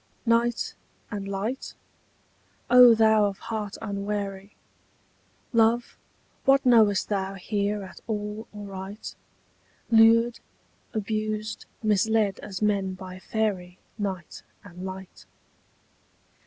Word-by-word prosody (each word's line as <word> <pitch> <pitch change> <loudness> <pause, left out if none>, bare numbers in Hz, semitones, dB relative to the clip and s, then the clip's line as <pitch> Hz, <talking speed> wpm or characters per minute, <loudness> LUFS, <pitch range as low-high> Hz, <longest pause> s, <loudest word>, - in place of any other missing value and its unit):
Night 235 0 +1 0.4
and 200 -2 -4
light? 200 +6 -4 1.0
O 245 -2 +9
thou 220 -1 +5
of 200 -1 -2
heart 210 -3 -5
unwary, 200 -1 -4 1.0
Love, 230 +1 +2 0.5
what 275 0 +4
knowest 220 -5 +5
thou 195 -1 -1
here 205 +1 -2
at 190 -2 -11
all 210 0 -4
aright, 200 0 -8 0.8
Lured, 230 +1 +5 0.5
abused, 215 0 -3 0.2
misled 215 -1 +2
as 200 0 -6
men 195 -3 +1
by 185 -1 -9
fairy 190 -4 -2 0.2
Night 190 -5 -4 0.2
and 180 -2 -11
light? 190 0 -8
210 Hz, 95 wpm, -26 LUFS, 195-220 Hz, 1.0 s, O